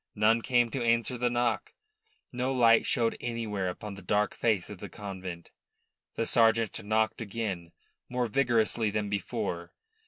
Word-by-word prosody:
None 110 Hz, +2 st, +4 dB
came 120 Hz, -1 st, +2 dB
to 130 Hz, -, -2 dB
answer 115 Hz, +2 st, +2 dB
the 125 Hz, 0 st, +1 dB
knock; 120 Hz, -4 st, 0 dB, 0.6 s
no 125 Hz, +2 st, -1 dB
light 115 Hz, -3 st, +5 dB
showed 115 Hz, -3 st, +1 dB
anywhere 110 Hz, -5 st, -2 dB
upon 105 Hz, +3 st, -6 dB
the 100 Hz, -, -10 dB
dark 105 Hz, +3 st, +1 dB
face 105 Hz, -6 st, +1 dB
of 105 Hz, -3 st, -9 dB
the 100 Hz, -, -7 dB
convent. 95 Hz, -3 st, -7 dB, 0.6 s
The 115 Hz, -, 0 dB
sergeant 115 Hz, -3 st, +3 dB
knocked 110 Hz, +2 st, +1 dB
again, 100 Hz, -6 st, -4 dB, 0.4 s
more 125 Hz, 0 st, 0 dB
vigorously 115 Hz, -2 st, +2 dB
than 105 Hz, 0 st, -2 dB
before. 100 Hz, -1 st, -3 dB
110 Hz, 150 wpm, -29 LUFS, 100-120 Hz, 0.6 s, light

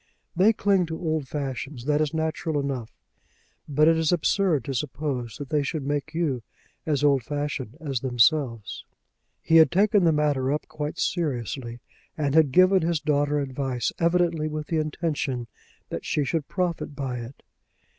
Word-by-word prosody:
They 190 Hz, +6 st, +5 dB
cling 200 Hz, -4 st, +2 dB
to 160 Hz, 0 st, -4 dB
old 155 Hz, -4 st, -1 dB
fashions. 135 Hz, -2 st, -5 dB
That 150 Hz, +1 st, +2 dB
is 150 Hz, -2 st, 0 dB
natural 160 Hz, 0 st, -1 dB
enough; 135 Hz, -5 st, -3 dB, 0.8 s
but 150 Hz, +2 st, +4 dB
it 165 Hz, 0 st, +5 dB
is 160 Hz, -1 st, +2 dB
absurd 175 Hz, -, +2 dB
to 135 Hz, -, -3 dB
suppose 130 Hz, -3 st, -3 dB
that 145 Hz, -2 st, -7 dB
they 150 Hz, -2 st, +2 dB
should 140 Hz, 0 st, -3 dB
make 145 Hz, +2 st, -2 dB
you 150 Hz, -8 st, 0 dB, 0.5 s
as 145 Hz, -2 st, +1 dB
old 140 Hz, -2 st, +4 dB
fashioned 145 Hz, -1 st, -4 dB
as 140 Hz, -6 st, -2 dB
themselves." 120 Hz, -2 st, +1 dB, 0.6 s
He 165 Hz, -, +5 dB
had 160 Hz, -, +7 dB
taken 200 Hz, +1 st, +3 dB
the 165 Hz, -, +5 dB
matter 145 Hz, -3 st, +1 dB
up 150 Hz, -, -2 dB
quite 155 Hz, +2 st, -5 dB
seriously, 120 Hz, -, -2 dB, 0.4 s
and 145 Hz, -3 st, 0 dB
had 155 Hz, -3 st, +5 dB
given 185 Hz, +4 st, +5 dB
his 165 Hz, -1 st, 0 dB
daughter 145 Hz, 0 st, +1 dB
advice 130 Hz, -3 st, -2 dB
evidently 170 Hz, -2 st, +2 dB
with 155 Hz, 0 st, -4 dB
the 165 Hz, -, +1 dB
intention 150 Hz, -5 st, -2 dB, 0.4 s
that -, -, -5 dB
she 150 Hz, -, 0 dB
should 145 Hz, +1 st, -2 dB
profit 175 Hz, -5 st, -2 dB
by 135 Hz, -3 st, -3 dB
it. 120 Hz, +3 st, -10 dB
150 Hz, 165 wpm, -25 LUFS, 135-160 Hz, 0.8 s, had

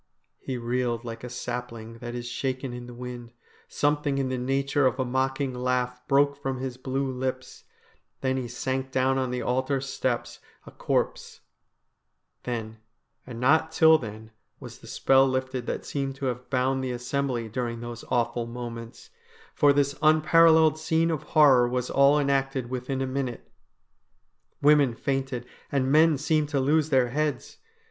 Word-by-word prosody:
He 130 Hz, -, -4 dB
reeled 120 Hz, 0 st, -2 dB
like 115 Hz, 0 st, -7 dB
a 125 Hz, -, -6 dB
sapling 115 Hz, -2 st, -6 dB
that 120 Hz, 0 st, -6 dB
is 120 Hz, 0 st, -5 dB
shaken 130 Hz, +1 st, -3 dB
in 120 Hz, 0 st, -8 dB
the 120 Hz, -, -10 dB
wind; 120 Hz, -1 st, -8 dB, 0.3 s
something 145 Hz, -1 st, 0 dB
in 135 Hz, -1 st, 0 dB
the 130 Hz, -, -2 dB
nature 135 Hz, +2 st, +1 dB
of 130 Hz, -, -2 dB
a 130 Hz, -, +1 dB
mocking 130 Hz, +1 st, -1 dB
laugh 125 Hz, 0 st, -1 dB
broke 140 Hz, +1 st, +3 dB
from 135 Hz, -1 st, -2 dB
his 130 Hz, -1 st, -4 dB
blue 135 Hz, +1 st, -2 dB
lips; 130 Hz, 0 st, -5 dB, 0.6 s
then 130 Hz, -1 st, 0 dB
he 130 Hz, -2 st, -3 dB
sank 130 Hz, +2 st, -3 dB
down 130 Hz, 0 st, +1 dB
on 130 Hz, -1 st, -1 dB
the 125 Hz, 0 st, -3 dB
altar 130 Hz, +2 st, 0 dB
steps 130 Hz, -2 st, -3 dB, 0.3 s
a -, -, -11 dB
corpse -, -, -2 dB, 1.0 s
Then 115 Hz, -2 st, -4 dB, 0.5 s
and 120 Hz, -2 st, -7 dB
not 160 Hz, +5 st, +3 dB
till 160 Hz, 0 st, +6 dB
then 110 Hz, -2 st, -9 dB, 0.3 s
was -, -, -10 dB
the -, -, -14 dB
spell 135 Hz, 0 st, +4 dB
lifted 130 Hz, -1 st, -2 dB
that -, -, -3 dB
seemed 135 Hz, -2 st, -3 dB
to 135 Hz, -, -5 dB
have 125 Hz, -1 st, -3 dB
bound 130 Hz, 0 st, 0 dB
the 130 Hz, -, -2 dB
assembly 125 Hz, -1 st, -2 dB
during 115 Hz, +1 st, -4 dB
those 120 Hz, -1 st, -7 dB
awful 120 Hz, -1 st, 0 dB
moments, 115 Hz, 0 st, -8 dB, 0.4 s
for 145 Hz, -, +4 dB
this 140 Hz, 0 st, +2 dB
unparalleled 160 Hz, 0 st, +5 dB
scene 160 Hz, +1 st, +1 dB
of 155 Hz, -, -2 dB, 0.2 s
horror 130 Hz, -5 st, +7 dB
was 125 Hz, 0 st, -2 dB
all 140 Hz, +1 st, +5 dB
enacted 135 Hz, -3 st, 0 dB
within 130 Hz, +1 st, -2 dB
a -, -, -1 dB
minute. 130 Hz, -2 st, -4 dB, 1.1 s
Women 145 Hz, -4 st, +5 dB
fainted, 135 Hz, -2 st, -2 dB, 0.3 s
and 135 Hz, -1 st, +1 dB
men 155 Hz, 0 st, +5 dB
seemed 150 Hz, +1 st, 0 dB
to 145 Hz, -2 st, 0 dB
lose 150 Hz, +3 st, +2 dB
their 130 Hz, -4 st, +3 dB
heads. 150 Hz, +3 st, -3 dB
130 Hz, 160 wpm, -26 LUFS, 125-140 Hz, 1.1 s, horror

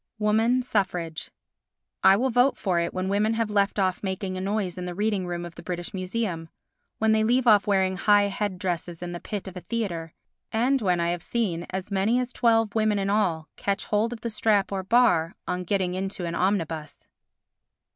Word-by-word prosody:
Woman 220 Hz, +4 st, +2 dB
Suffrage 180 Hz, -8 st, -2 dB, 0.7 s
I 190 Hz, +1 st, +7 dB
will 260 Hz, +4 st, +1 dB
vote 245 Hz, +3 st, +3 dB
for 180 Hz, -4 st, 0 dB
it 170 Hz, 0 st, -1 dB
when 185 Hz, 0 st, -3 dB
women 210 Hz, +3 st, +1 dB
have 225 Hz, -2 st, -1 dB
left 200 Hz, 0 st, +1 dB
off 185 Hz, -2 st, +1 dB
making 190 Hz, -1 st, -3 dB
a 185 Hz, -, -4 dB
noise 195 Hz, -2 st, -1 dB
in 180 Hz, -, -5 dB
the 180 Hz, -1 st, -5 dB
reading 205 Hz, -2 st, 0 dB
room 175 Hz, 0 st, -4 dB
of 170 Hz, -, -9 dB
the -, -, -11 dB
British 175 Hz, -1 st, -5 dB
Museum, 185 Hz, -3 st, -3 dB, 0.5 s
when 220 Hz, 0 st, +2 dB
they 220 Hz, 0 st, +3 dB
leave 245 Hz, +3 st, +2 dB
off 210 Hz, -3 st, +5 dB
wearing 190 Hz, -2 st, +2 dB
high 205 Hz, +1 st, +4 dB
head 200 Hz, -1 st, -2 dB
dresses 175 Hz, -2 st, -3 dB
in 175 Hz, -, -5 dB
the 175 Hz, -, -5 dB
pit 205 Hz, +1 st, -5 dB
of 190 Hz, -, -8 dB
a 180 Hz, -, -6 dB
theatre 175 Hz, -5 st, -4 dB, 0.4 s
and 250 Hz, +4 st, +2 dB
when 180 Hz, -4 st, +1 dB
I 170 Hz, 0 st, +1 dB
have 175 Hz, -1 st, -3 dB
seen 180 Hz, -6 st, -2 dB
as 190 Hz, +2 st, -5 dB
many 200 Hz, +5 st, +2 dB
as 250 Hz, 0 st, -3 dB
twelve 225 Hz, -3 st, +2 dB
women 215 Hz, -2 st, +2 dB
in 195 Hz, 0 st, 0 dB
all 175 Hz, -7 st, +1 dB
catch 200 Hz, +2 st, -1 dB
hold 215 Hz, +2 st, +1 dB
of 240 Hz, -, -7 dB
the 235 Hz, -, -3 dB
strap 210 Hz, -2 st, +1 dB
or 195 Hz, -1 st, -1 dB
bar 190 Hz, -6 st, +3 dB
on 180 Hz, 0 st, -2 dB
getting 185 Hz, -1 st, 0 dB
into 190 Hz, -1 st, -3 dB
an 170 Hz, -, -3 dB
omnibus. 165 Hz, -5 st, -2 dB
195 Hz, 205 wpm, -26 LUFS, 180-220 Hz, 0.7 s, I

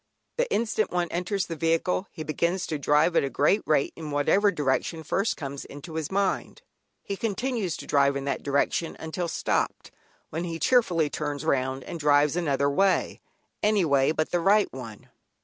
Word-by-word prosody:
The -, -, 0 dB
instant 220 Hz, -2 st, 0 dB
one 175 Hz, -1 st, -1 dB
enters 180 Hz, +3 st, -1 dB
the 165 Hz, -, -5 dB
vehicle 165 Hz, +4 st, 0 dB
he 155 Hz, -, -7 dB
begins 170 Hz, +4 st, -1 dB
to 155 Hz, -, -3 dB
drive 150 Hz, +4 st, +3 dB
at -, -, +4 dB
a 140 Hz, -, -1 dB
great 150 Hz, +10 st, +2 dB
rate 150 Hz, -2 st, +2 dB
in 160 Hz, -2 st, -7 dB
whatever 170 Hz, +8 st, +3 dB
direction 150 Hz, +1 st, -1 dB
first 195 Hz, +7 st, 0 dB
comes 140 Hz, -2 st, -6 dB
into 150 Hz, +3 st, -10 dB
his 160 Hz, -2 st, -3 dB
mind. 195 Hz, 0 st, -1 dB, 0.4 s
He 200 Hz, -, -4 dB
continues 225 Hz, -3 st, -2 dB
to -, -, -9 dB
drive 140 Hz, -1 st, +3 dB
in 140 Hz, 0 st, -3 dB
that 140 Hz, -, -2 dB
direction 140 Hz, +3 st, 0 dB
until 165 Hz, +2 st, -3 dB
stopped, -, -, -1 dB, 0.4 s
when 165 Hz, +3 st, -3 dB
he 165 Hz, -2 st, -4 dB
cheerfully 170 Hz, -, +2 dB
turns 145 Hz, -2 st, -3 dB
round 130 Hz, 0 st, 0 dB
and 170 Hz, -, -7 dB
drives 145 Hz, 0 st, +3 dB
another 140 Hz, -5 st, +1 dB
way, 190 Hz, +7 st, +1 dB, 0.4 s
any 210 Hz, -3 st, +3 dB
way 140 Hz, -1 st, +3 dB
but 155 Hz, 0 st, -1 dB
the 175 Hz, -, +2 dB
right 200 Hz, +4 st, +3 dB
one. 115 Hz, -5 st, -9 dB
160 Hz, 180 wpm, -26 LUFS, 145-190 Hz, 0.4 s, at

